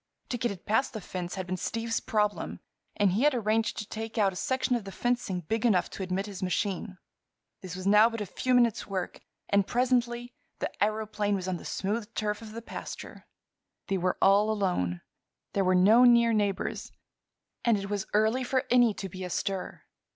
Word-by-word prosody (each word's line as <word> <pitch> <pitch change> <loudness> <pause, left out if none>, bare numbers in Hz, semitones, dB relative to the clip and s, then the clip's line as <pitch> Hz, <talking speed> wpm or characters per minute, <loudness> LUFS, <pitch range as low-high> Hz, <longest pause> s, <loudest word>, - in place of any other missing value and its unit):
To 245 - -1
get 240 - +1
it 190 -3 -8
past 225 +6 +1
the 220 - -4
fence 180 -2 -5
had 190 -1 -4
been 185 +1 -3
Steve's 230 +4 -2
problem, 210 -1 -1 0.4
and 205 -3 +3
he 200 +6 +1
had 295 -1 +4
arranged 220 -1 0
to 210 - -4
take 225 +1 -6
out 200 -3 +3
a - - -11
section 260 +4 0
of 235 - -2
the 195 - -8
fencing 240 -6 -1
big 220 +7 -2
enough 210 -7 +2
to - - -7
admit 190 +1 -2
his 200 -2 -8
machine. 190 +1 -2 0.6
This 185 -3 -7
was 185 0 -6
now 210 +3 +6
but 230 -1 -5
a 210 - -2
few 250 +6 0
minutes' 235 -3 +3
work, 190 -3 -4 0.3
and 200 -1 +2
presently 245 -1 0 0.2
the - - -3
aëroplane 210 -1 0
was 185 -1 -4
on 185 -1 -1
the - - -12
smooth 210 +3 -2
turf 210 0 -1
of 220 -1 -9
the 230 +1 -7
pasture. - - -8 0.6
They 195 -1 +1
were 180 +1 0
all 205 +2 +5
alone. 180 - 0 0.5
There 200 - +2
were 185 0 +3
no 210 +7 +6
near 235 -1 +6
neighbors, 205 -3 -1 0.7
and 235 -3 +3
it 200 0 -4
was 205 0 -2
early 220 +5 +3
for 260 +2 0
any 240 -4 +5
to 195 - -5
be 185 +1 -8
astir. 185 +1 -3
210 Hz, 195 wpm, -29 LUFS, 190-230 Hz, 0.7 s, now